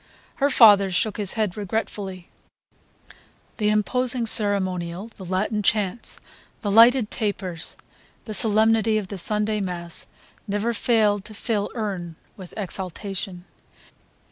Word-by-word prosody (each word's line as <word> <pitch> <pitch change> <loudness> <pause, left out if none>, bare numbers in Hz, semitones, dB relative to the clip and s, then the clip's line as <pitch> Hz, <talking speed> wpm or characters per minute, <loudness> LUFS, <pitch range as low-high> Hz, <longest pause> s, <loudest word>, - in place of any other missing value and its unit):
Her 280 0 +2
father 205 -7 +6
shook 195 +3 0
his 205 -3 0
head 215 -5 -1
regretfully. 200 -3 -4 1.3
The 210 -2 +1
imposing 240 +3 +1
ceremonial, 190 -3 0
the 210 - -13
Latin 200 +4 -1
chants, 210 +2 -1 0.4
the 205 - -2
lighted 230 +1 +6
tapers, 190 -6 -3 0.5
the 215 - -6
solemnity 220 0 +4
of 200 -3 -4
the 200 - -6
Sunday 210 +3 0
mass 175 -3 -5 0.4
never 205 +3 -1
failed 210 -3 +2
to 215 - -8
fill 210 -2 -2
him 190 -7 -4 0.2
with 185 -3 -10
exaltation. 190 -1 -4
205 Hz, 115 wpm, -23 LUFS, 190-220 Hz, 1.3 s, father